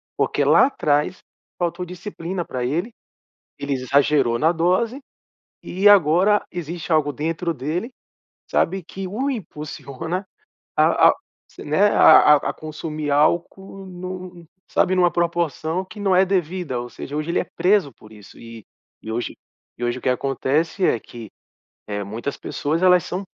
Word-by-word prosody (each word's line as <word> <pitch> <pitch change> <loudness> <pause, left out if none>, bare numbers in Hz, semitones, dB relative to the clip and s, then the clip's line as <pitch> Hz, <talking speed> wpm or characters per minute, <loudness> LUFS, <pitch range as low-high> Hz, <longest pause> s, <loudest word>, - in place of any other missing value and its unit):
porque - - 0
lá - - +5
atrás 150 - 0 0.4
faltou 175 +1 -2
disciplina 180 -1 -5
pra 125 -1 -4
ele 170 - -2 0.7
ele 140 0 -2
exagerou 135 -1 +2
na 160 +5 +3
dose, 185 - 0 0.6
e 190 +3 +1
agora 195 +2 +5
existe 170 -1 -6
algo 155 -2 +2
dentro 165 +4 -2
dele, 160 - -3 0.6
sabe? 190 +2 0
Que 190 +3 -7
o 245 +9 -2
impulsiona 160 - -5 0.5
a - - +5
a - - +1 0.4
se, - - -12
né, 175 +8 +3
a 150 -6 +7
a - - -2
consumir 155 -1 -5
álcool, 175 +6 0
num 180 -1 -8 0.2
sabe 185 - +2
numa 175 -1 +4
proporção 170 0 -1
que 210 - -13
não 195 -2 +2
é 190 - +6
devida. 180 -7 -2
Ou 120 - -6
seja, 145 - -8
hoje 155 +2 -2
ele - - +1
é - - -4
preso 185 -6 +2
por 110 -1 -18
isso 105 -2 -15
e 115 -2 -11 0.4
e 110 - -6
hoje 120 +2 -4 0.4
e 120 - -3
hoje 120 +1 -1
o - - -11
que - - 0
acontece, 140 +7 0
é - - +3
que, 115 -2 -11 0.6
eh, 105 -1 -3
muitas 115 +8 -5
pessoas, 155 +4 -2
elas 180 -1 +5
são 185 +2 -4
165 Hz, 155 wpm, -22 LUFS, 140-185 Hz, 0.7 s, a